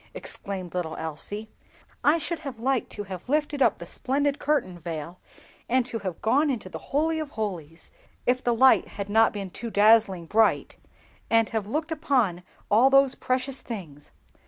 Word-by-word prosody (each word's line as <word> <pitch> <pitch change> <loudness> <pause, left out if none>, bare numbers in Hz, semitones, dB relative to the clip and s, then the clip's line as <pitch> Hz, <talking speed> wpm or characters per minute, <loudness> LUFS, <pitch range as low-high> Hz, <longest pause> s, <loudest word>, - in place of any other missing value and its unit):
exclaimed 195 - -6
little 170 -3 -3
Elsie. 160 +7 -5 0.6
"I 295 +3 +5
should 335 0 -3
have 270 -4 -7
liked 255 +2 0
to 205 - -5
have 190 +2 -8
lifted 295 -1 0
up 235 -5 +4
the 170 - -8
splendid 280 +9 -1
curtain 255 -12 0
veil, 165 +1 -6 0.5
and 255 0 +3
to 235 -2 -4
have 185 -5 -6
gone 280 +7 +3
into 220 -8 -3
the - - -7
Holy 315 +3 +1
of 310 -2 -4
holies—if 205 - -4
the 240 -1 +2
light 260 +3 +5
had 200 0 -6
not 225 +2 +4
been 195 -3 -6
too 230 +6 -6
dazzling 205 -4 +4
bright—and 225 +2 0
have 220 -3 -2
looked 310 +7 -2
upon 255 - +1 0.3
all 235 +6 +6
those 275 -1 +5
precious 255 +1 -2
things! 165 - -8
225 Hz, 160 wpm, -26 LUFS, 185-270 Hz, 0.6 s, all